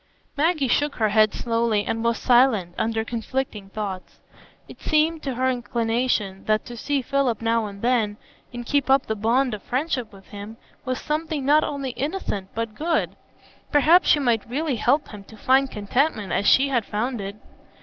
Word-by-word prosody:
Maggie 305 -1 +1
shook 290 +3 +1
her 220 -2 +1
head 215 0 +4
slowly, 230 -3 0
and 225 0 -2
was 235 0 +1
silent, 240 -8 +3
under 225 0 -1
conflicting 230 -3 -4
thoughts. 195 -3 -6 0.5
It - - -14
seemed 310 +1 +1
to 270 -3 -3
her 260 +2 +1
inclination, 235 -5 -1
that 215 0 +1
to 240 - -8
see 275 +3 -1
Philip 275 -5 0
now 230 -1 0
and 200 0 -10
then, 230 -4 +1 0.3
and 240 0 -7
keep 285 +1 0
up 270 0 +4
the 220 - -1
bond 235 +4 +1
of 210 - -5
friendship 255 -3 -2
with 195 -2 -16
him, 205 +2 -9 0.3
was 255 -1 -2
something 305 -2 -2
not 300 +2 +5
only 275 -3 -3
innocent, 250 - -4
but 230 -1 -3
good; 320 +8 -1 0.6
perhaps 315 +5 +5
she - - +6
might 235 -4 0
really 280 0 -1
help 275 +7 +1
him 205 -2 -10
to 220 - -14
find 265 +4 +3
contentment 210 - -1
as 200 - +1
she 275 +1 +5
had 240 -4 +1
found 225 +3 -3
it. 200 +1 -6
240 Hz, 180 wpm, -23 LUFS, 215-275 Hz, 0.6 s, she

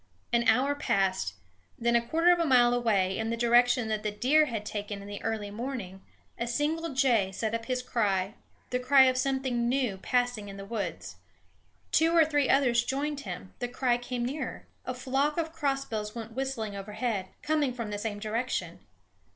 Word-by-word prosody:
An 235 0 +3
hour 255 +6 +4
passed; 190 - 0 0.4
then, 235 0 +1
a 235 - +5
quarter 330 +9 +3
mile 245 -5 +5
away, 205 -6 +1
in 225 0 -1
the 230 - -1
direction 240 0 +4
that 215 -1 -1
the 215 - -1
deer 260 +9 +3
had 225 -6 -4
taken 205 -1 -4
in 200 - -10
the 205 0 -7
early 215 -2 -3
morning, 210 -5 -5 0.4
a 235 - -1
single 305 +7 -1
jay 235 -8 +3
set 220 +3 -3
up 230 0 -2
his 255 -1 -1
cry, 200 -5 0 0.4
the 250 - +1
cry 265 +2 +6
of 255 -1 +3
something 255 -2 0
new 250 -6 0
passing 245 -1 -1
in 195 - -9
the 195 - -7
woods. 200 -6 -5 0.7
Two 325 +1 +3
or 325 - +7
three 290 -3 +1
others 245 -4 +4
joined 285 +3 -2
him; 185 -6 -7
the 245 - -2
cry 245 0 +1
came 245 0 -3
nearer. 280 +5 -4 0.2
A 255 - -2
flock 270 +4 0
of 325 -1 -2
crossbills 270 -9 -2
went 225 -1 -6
whistling 245 -5 -3
overhead, 205 0 -3 0.2
coming 300 -3 +1
from 230 -4 -5
the 205 - -3
same 210 -1 -3
direction. 225 +4 -3
240 Hz, 180 wpm, -29 LUFS, 210-265 Hz, 0.7 s, or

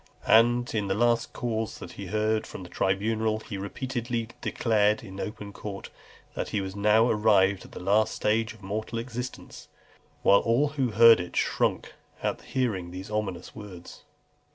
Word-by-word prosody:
And 120 +2 +4
in 105 -3 -1
the 95 - 0
last 120 +1 +2
cause 110 -2 -3
he 100 - -8
heard 110 +2 0
from 95 - -8
the 90 - -10
tribunal, 110 +4 0
he 105 - -7
repeatedly 120 +2 -3
declared 110 0 +1
in 95 -3 -9
open 105 -1 -6
court, 100 -1 -7 0.4
"That - - -4
he 105 - -1
was 95 0 -5
now 105 +3 +4
arrived 100 -4 +3
at - - -15
the - - -7
last 105 +4 +2
stage 110 +1 +1
of 105 - -19
mortal 110 +4 -4
existence;" 125 +1 -6 0.6
whilst 100 - +5
all 130 +6 +3
who 135 -4 -1
heard 115 -1 +7
it 90 -1 -6
shrunk - - 0 0.3
at - - -1
hearing 105 -9 -2
these 95 +3 -8
ominous 100 -5 -3
words. 100 -5 -10
110 Hz, 160 wpm, -27 LUFS, 100-115 Hz, 0.6 s, heard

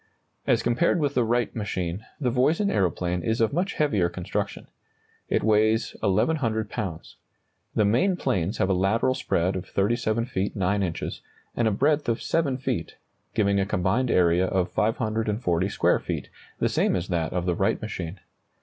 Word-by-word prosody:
As - - +3
compared 125 +9 +2
with 145 -3 0
the 125 - +2
Wright 120 +1 0
machine, 95 -3 -3 0.2
the 125 -5 0
Voisin 155 - +2
aeroplane 90 -2 0
is 110 +5 -1
of 115 +3 +2
much 180 +4 0
heavier 105 - +2
construction. 90 0 -4 0.6
It - - +1
weighs 110 +1 +2
1,100 110 +1 +1
pounds. 95 -9 -5 0.6
The 105 - +3
main 125 - +3
planes 95 - -1
have 95 - +2
a 95 - +2
lateral 100 +7 +2
spread 95 -8 0
of 95 - -5
37 110 +2 0
feet 95 -4 -2
9 100 0 +1
inches, 85 -4 -3 0.3
and 120 - +2
a - - +3
breadth 145 +6 +1
of 115 - 0
7 145 -6 0
feet, 130 - -3 0.4
giving 100 -1 +2
a 95 - +1
combined 100 +7 +1
area 90 -1 +3
of 90 -1 0
540 110 - 0
square - - +2
feet, - - -4 0.3
the - - +1
same - - +1
as 90 0 -3
that 85 -3 -1
of 90 -1 -2
the 90 - +1
Wright 95 +3 +1
machine. 95 -4 -5
105 Hz, 170 wpm, -25 LUFS, 95-120 Hz, 0.6 s, As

